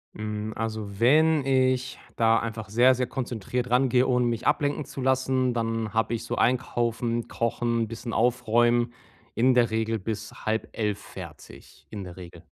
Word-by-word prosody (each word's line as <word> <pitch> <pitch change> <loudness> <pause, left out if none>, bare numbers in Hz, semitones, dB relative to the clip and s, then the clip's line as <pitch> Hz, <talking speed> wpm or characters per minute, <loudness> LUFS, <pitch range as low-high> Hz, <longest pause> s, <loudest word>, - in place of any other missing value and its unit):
Hm, 105 0 -4
also, 110 -3 -4
wenn 150 +4 +4
ich 130 -1 +1 0.2
da 115 0 +4
einfach 110 -2 -5
sehr, 125 +5 +5
sehr 125 0 -1
konzentriert 125 0 -3
rangehe, 125 0 +3
ohne 125 -1 +2
mich 115 -2 -2
ablenken 145 0 +1
zu 135 - -10
lassen, 130 -1 +1
dann 115 -2 -2
habe 115 +1 +1
ich 115 - -3
so - - -3
einkaufen, 120 -1 0
kochen, 115 0 -1
bisschen 115 +1 -6
aufräumen, 120 0 +2 0.4
in 130 +3 +4
der 120 -2 +3
Regel 110 0 -1
bis 105 +2 -5
22:30 110 -1 -2
fertig, - - -12
in 105 -2 -6
der 90 -1 -10
Regel. 90 -2 -11
120 Hz, 155 wpm, -26 LUFS, 110-125 Hz, 0.4 s, sehr